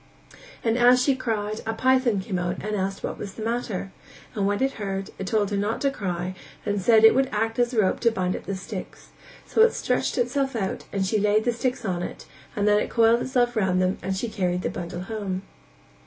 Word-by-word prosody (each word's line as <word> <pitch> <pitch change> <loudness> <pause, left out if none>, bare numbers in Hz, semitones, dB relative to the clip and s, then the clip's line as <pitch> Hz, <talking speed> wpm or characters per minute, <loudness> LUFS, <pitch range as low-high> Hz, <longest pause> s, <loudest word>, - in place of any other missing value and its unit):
and 230 +1 +1
as 245 +1 +6
she 270 +1 +3
cried 215 -4 -2
a 225 - 0
python 255 -3 +3
came 190 -1 -3
out 175 0 -2
and 215 0 -1
asked 195 0 -2
what - - -4
was 200 -2 -7
the 220 - -6
matter, 225 -5 -2 0.4
and 200 -2 0
when 205 0 0
it 270 - +2
heard, 195 -1 -3
it 195 - -4
told 210 0 +1
her 200 - 0
not 205 +3 -1
to 275 - +1
cry 180 -6 -3 0.3
and 205 -1 0
said 220 +3 +5
that - - +11
it - - +1
would 265 +1 +2
act 225 +2 -1
as 240 0 +2
a 235 - 0
rope 190 -3 +2
to 235 - +4
bind 185 -5 -1
up - - -7
the 195 - -2
sticks; 190 0 -8 0.4
so - - +2
it 455 +1 +7
stretched - - -1
itself 265 +2 0
out 195 -4 -2
and 195 -1 0
she 210 +3 +1
laid 210 +1 +3
the 240 - +1
sticks 250 0 -2
on 180 -3 -1
it - - -6 0.3
and 205 0 +1
then 210 0 +5
it - - -2
coiled 230 0 +4
itself 245 -2 +1
round 190 -4 +2
them 185 +1 +1
and 190 0 -2
she 235 - -2
carried 185 -5 -1
the - - -1
bundle 175 0 -5
home. 195 -2 -4
210 Hz, 235 wpm, -25 LUFS, 190-235 Hz, 0.4 s, that